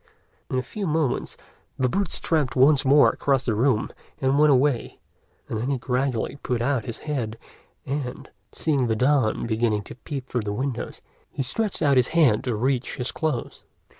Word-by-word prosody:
In 130 Hz, -, -1 dB
a 130 Hz, -, 0 dB
few 195 Hz, -, -5 dB
moments, 155 Hz, -4 st, -1 dB, 0.4 s
the 130 Hz, -2 st, +2 dB
boots 195 Hz, +10 st, -1 dB
tramped 150 Hz, -6 st, 0 dB
once 140 Hz, +2 st, +5 dB
more 140 Hz, +1 st, +6 dB
across 135 Hz, -2 st, 0 dB
the 115 Hz, -, +1 dB
room 115 Hz, 0 st, +1 dB, 0.3 s
and 135 Hz, +1 st, +2 dB
went 150 Hz, 0 st, +6 dB
away; 135 Hz, -1 st, +1 dB, 0.5 s
and 110 Hz, -, -3 dB
then 125 Hz, +4 st, -2 dB
he 140 Hz, -, +1 dB
gradually 125 Hz, 0 st, -1 dB
put 125 Hz, -2 st, -1 dB
out 120 Hz, -2 st, 0 dB
his 115 Hz, -, -6 dB
head, 120 Hz, -7 st, -3 dB, 0.5 s
and, 135 Hz, -2 st, -4 dB, 0.2 s
seeing 140 Hz, -6 st, 0 dB
the 110 Hz, -, +1 dB
dawn 130 Hz, -1 st, +2 dB
beginning 110 Hz, -2 st, 0 dB
to -, -, -10 dB
peep 135 Hz, +1 st, -6 dB
through 125 Hz, -, -1 dB
the 105 Hz, -1 st, -3 dB
window, 130 Hz, +1 st, -3 dB, 0.4 s
he 135 Hz, -, -3 dB
stretched 205 Hz, -, -1 dB
out 140 Hz, -3 st, +4 dB
his 125 Hz, -, +4 dB
hand 125 Hz, -10 st, +4 dB
to 125 Hz, -3 st, 0 dB
reach 125 Hz, +3 st, -1 dB
his 125 Hz, 0 st, -3 dB
clothes. 155 Hz, -7 st, -3 dB
130 Hz, 180 wpm, -24 LUFS, 120-145 Hz, 0.5 s, more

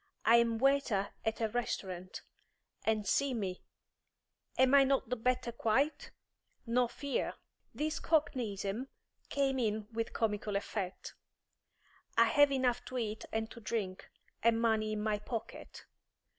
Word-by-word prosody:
I 230 Hz, +1 st, +7 dB
am 230 Hz, -1 st, +3 dB
waiter 260 Hz, -6 st, +2 dB
at 220 Hz, 0 st, -1 dB
a 220 Hz, -, +1 dB
restaurant. 185 Hz, -6 st, -4 dB, 0.6 s
And 215 Hz, -2 st, +1 dB
see 275 Hz, +4 st, +2 dB
me; 190 Hz, -5 st, -3 dB, 1.0 s
am 260 Hz, +1 st, +5 dB
I 280 Hz, -1 st, +8 dB
not 270 Hz, -4 st, +1 dB
the 250 Hz, -, 0 dB
better 250 Hz, +1 st, 0 dB
quite? 270 Hz, +7 st, 0 dB, 0.6 s
No 245 Hz, +1 st, +2 dB
fear!" 280 Hz, +3 st, -2 dB, 0.4 s
This 305 Hz, +1 st, -1 dB
cockneyism 240 Hz, -, 0 dB, 0.4 s
came 270 Hz, -2 st, +1 dB
in 215 Hz, -2 st, -1 dB
with 230 Hz, 0 st, -2 dB
comical 210 Hz, -2 st, -1 dB
effect. 200 Hz, -2 st, -3 dB, 1.0 s
"I 230 Hz, -, +7 dB
have 290 Hz, +5 st, +5 dB
enough 255 Hz, -3 st, +1 dB
to 255 Hz, -, -5 dB
eat 220 Hz, -2 st, -3 dB
and 220 Hz, +1 st, -2 dB
to 235 Hz, -, -9 dB
drink, 205 Hz, -5 st, -3 dB, 0.3 s
and 230 Hz, 0 st, +3 dB
money 220 Hz, -2 st, +2 dB
in 210 Hz, -, -2 dB
my 215 Hz, -1 st, 0 dB
pocket. 225 Hz, +2 st, -7 dB
230 Hz, 135 wpm, -33 LUFS, 215-255 Hz, 1.0 s, I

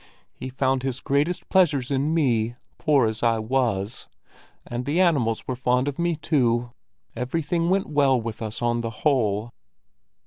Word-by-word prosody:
He 130 Hz, -, -7 dB
found 130 Hz, 0 st, 0 dB
his 130 Hz, -1 st, -3 dB
greatest 145 Hz, +7 st, 0 dB
pleasures 145 Hz, -9 st, +2 dB
in 140 Hz, +3 st, +1 dB
me, 120 Hz, -8 st, +1 dB, 0.2 s
poor 145 Hz, -5 st, +3 dB
as 110 Hz, 0 st, -2 dB
I 115 Hz, -1 st, +2 dB
was; 110 Hz, -3 st, -1 dB, 0.6 s
and 120 Hz, +1 st, -4 dB
the 150 Hz, +5 st, 0 dB
animals 140 Hz, -12 st, +2 dB
were 130 Hz, -, -2 dB
fond 125 Hz, +1 st, +1 dB
of 145 Hz, +1 st, -4 dB
me 170 Hz, -1 st, +1 dB
too. 120 Hz, -6 st, +1 dB, 0.4 s
Everything 165 Hz, +7 st, -1 dB
went 190 Hz, +1 st, +2 dB
well 140 Hz, -4 st, +2 dB
with 115 Hz, -1 st, -6 dB
us 110 Hz, +2 st, -4 dB
on 120 Hz, 0 st, +1 dB
the 115 Hz, -, -3 dB, 0.2 s
whole." 115 Hz, -5 st, +1 dB
130 Hz, 160 wpm, -24 LUFS, 120-145 Hz, 0.6 s, poor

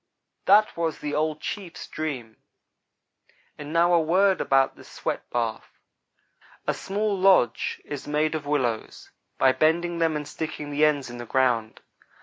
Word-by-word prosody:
That 210 Hz, +2 st, +5 dB
was 165 Hz, -2 st, -1 dB
the 150 Hz, 0 st, -5 dB
old 155 Hz, 0 st, -1 dB
chief's 190 Hz, -5 st, -6 dB
dream 130 Hz, -8 st, -5 dB, 1.2 s
and 150 Hz, 0 st, -8 dB
now 170 Hz, +2 st, +3 dB
a 170 Hz, -, +5 dB
word 185 Hz, +3 st, +3 dB
about 135 Hz, 0 st, +2 dB
the -, -, -14 dB
sweat -, -, -5 dB
bath. 115 Hz, -2 st, -3 dB, 0.9 s
A -, -, +1 dB
small 205 Hz, +1 st, -2 dB
lodge 185 Hz, -11 st, +3 dB
is 145 Hz, -2 st, -7 dB
made 150 Hz, +1 st, +1 dB
of 150 Hz, -2 st, -4 dB
willows, 125 Hz, -7 st, -2 dB, 0.3 s
by 130 Hz, -, +5 dB
bending 170 Hz, +4 st, +1 dB
them 165 Hz, -1 st, +2 dB
and 150 Hz, -1 st, -4 dB
sticking 150 Hz, -1 st, -5 dB
the 150 Hz, +1 st, +3 dB
ends 145 Hz, -5 st, 0 dB
in 120 Hz, -, -8 dB
the 120 Hz, -, -7 dB
ground. 120 Hz, -4 st, +1 dB
150 Hz, 150 wpm, -25 LUFS, 135-170 Hz, 1.2 s, That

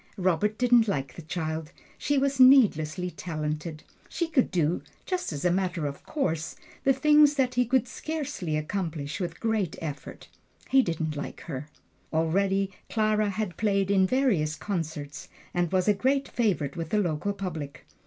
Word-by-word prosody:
Robert 190 Hz, +3 st, +1 dB
didn't 240 Hz, -2 st, +4 dB
like 135 Hz, -9 st, -2 dB
the -, -, -9 dB
child 160 Hz, -1 st, -4 dB, 0.2 s
she 290 Hz, -, 0 dB
was 275 Hz, 0 st, +1 dB
needlessly 185 Hz, -, +5 dB
talented. 155 Hz, -1 st, -4 dB, 0.3 s
She 340 Hz, 0 st, -1 dB
could 290 Hz, -6 st, +2 dB
do, 170 Hz, -1 st, +1 dB, 0.2 s
just 365 Hz, -, -2 dB
as 145 Hz, +1 st, -4 dB
a 180 Hz, -, +4 dB
matter 180 Hz, -3 st, -1 dB
of 140 Hz, -1 st, -4 dB
course, 165 Hz, -, -2 dB, 0.3 s
the 270 Hz, -, +5 dB
things 295 Hz, +2 st, +5 dB
that 255 Hz, -3 st, +1 dB
he 250 Hz, -1 st, +2 dB
could 255 Hz, 0 st, +2 dB
scarcely 285 Hz, -, -3 dB
accomplish 155 Hz, -2 st, -3 dB
with 175 Hz, -2 st, -4 dB
great 220 Hz, -7 st, 0 dB
effort. 150 Hz, -3 st, -7 dB, 0.4 s
He 270 Hz, -, +7 dB
didn't 160 Hz, -6 st, -2 dB
like 145 Hz, -, -6 dB
her. 145 Hz, -2 st, -6 dB, 0.4 s
Already 195 Hz, +5 st, +1 dB, 0.2 s
Clara 215 Hz, -1 st, +2 dB
had 200 Hz, -2 st, -3 dB
played 200 Hz, -2 st, +1 dB
in 190 Hz, -1 st, +4 dB
various 195 Hz, -, +1 dB
concerts, 155 Hz, -7 st, -5 dB, 0.2 s
and 175 Hz, -2 st, 0 dB
was 185 Hz, 0 st, +1 dB
a 210 Hz, -, +6 dB
great 270 Hz, +7 st, +1 dB
favorite 175 Hz, -, 0 dB
with 165 Hz, -2 st, -4 dB
the 215 Hz, -, +1 dB
local 175 Hz, -1 st, 0 dB
public. 165 Hz, -8 st, -6 dB
185 Hz, 160 wpm, -27 LUFS, 160-235 Hz, 0.4 s, He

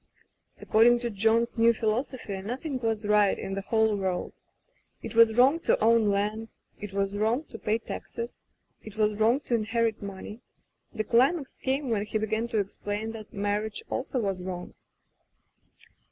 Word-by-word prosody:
According 235 Hz, +3 st, +5 dB
to 240 Hz, -1 st, -2 dB
John's 225 Hz, +3 st, +1 dB
new 230 Hz, +1 st, +6 dB
philosophy 220 Hz, -2 st, -2 dB
noth 245 Hz, -, -5 dB
ing 275 Hz, -5 st, -2 dB
was 225 Hz, -2 st, -1 dB
right 210 Hz, -1 st, +3 dB
in 195 Hz, -, -5 dB
the 195 Hz, -, -2 dB
whole 220 Hz, +1 st, +2 dB
worid. 190 Hz, -2 st, -2 dB, 0.7 s
It -, -, -6 dB
was 230 Hz, -1 st, +6 dB
wrong 270 Hz, +6 st, +5 dB
to -, -, +1 dB
own 225 Hz, 0 st, +4 dB
land, 210 Hz, +3 st, -1 dB, 0.3 s
it 205 Hz, -1 st, -7 dB
was 195 Hz, 0 st, -1 dB
wrong 220 Hz, +7 st, +1 dB
to 225 Hz, -, -8 dB
pay 215 Hz, +1 st, 0 dB
taxes, 230 Hz, +1 st, -7 dB, 0.4 s
it 215 Hz, -1 st, -11 dB
was 210 Hz, -1 st, +1 dB
wrong 235 Hz, +6 st, +3 dB
to 255 Hz, -, -4 dB
inherit 225 Hz, 0 st, 0 dB
money. 200 Hz, +3 st, -8 dB, 0.5 s
The 220 Hz, -3 st, -2 dB
climax 265 Hz, +6 st, +2 dB
came 265 Hz, -1 st, -1 dB
when 205 Hz, -2 st, +1 dB
he 220 Hz, -, -1 dB
began 220 Hz, +1 st, -1 dB
to 230 Hz, -, -2 dB
explain 205 Hz, +2 st, -3 dB
that 220 Hz, -2 st, -10 dB
marriage 205 Hz, -, -2 dB
also -, -, -2 dB
was 195 Hz, -4 st, -2 dB
wrong. 180 Hz, -1 st, -6 dB
220 Hz, 165 wpm, -27 LUFS, 205-235 Hz, 0.7 s, new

